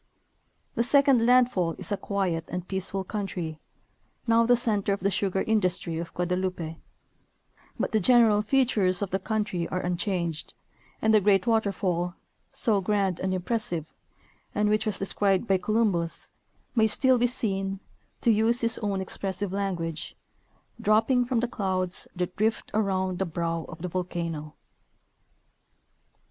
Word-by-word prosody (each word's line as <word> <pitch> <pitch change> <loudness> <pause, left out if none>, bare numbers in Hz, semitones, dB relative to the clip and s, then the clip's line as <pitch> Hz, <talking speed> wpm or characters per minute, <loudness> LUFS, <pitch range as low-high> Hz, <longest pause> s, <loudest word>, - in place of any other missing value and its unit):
The 235 - +1
second 270 -2 +4
landfall 245 -9 +3
is 220 - -7
a - - +2
quiet 190 -5 -2
and 180 0 -5
peaceful 190 0 -2
country, 180 -6 -4 0.7
now 230 0 +4
the 245 0 +5
center 210 -4 0
of 195 - -4
the 200 +2 +1
sugar 190 0 0
industry 180 -6 0
of 170 - -6
Guadeloupe, 180 -2 -2 1.0
but - - -1
the 220 - +3
general 220 0 +5
features 210 -6 +2
of 195 - -4
the 190 - 0
country 205 -4 -2
are 185 - -2
unchanged, 175 -2 -2 0.5
and 220 0 +4
the 215 - +6
great 195 0 +3
waterfall, 195 -6 0 0.4
so 210 -5 +1
grand 195 -2 0
and 190 - -1
impressive, 180 -4 -3 0.6
and 210 0 +2
which 215 +1 +1
was 210 - 0
described 195 0 +1
by 195 -3 +2
Colum 215 +2 +2
bus, 170 -2 -2 0.4
may 220 -2 +4
still 255 +3 +3
be 245 - +3
seen 195 -5 0 0.4
(to 235 - +4
use 225 +3 +3
his 230 -1 +1
own 200 -3 -1
expressive 190 0 -3
language) 170 -5 -3 0.6
"dropping 225 +4 +3
from 240 -2 0
the 245 - 0
clouds 190 -5 -1
that 180 0 -3
drift 220 +2 0
around 190 -3 0
the 190 - +1
brow 165 0 -2
of 160 0 -10
the - - -1
volcano." 170 -4 -4
195 Hz, 145 wpm, -27 LUFS, 180-220 Hz, 1.0 s, the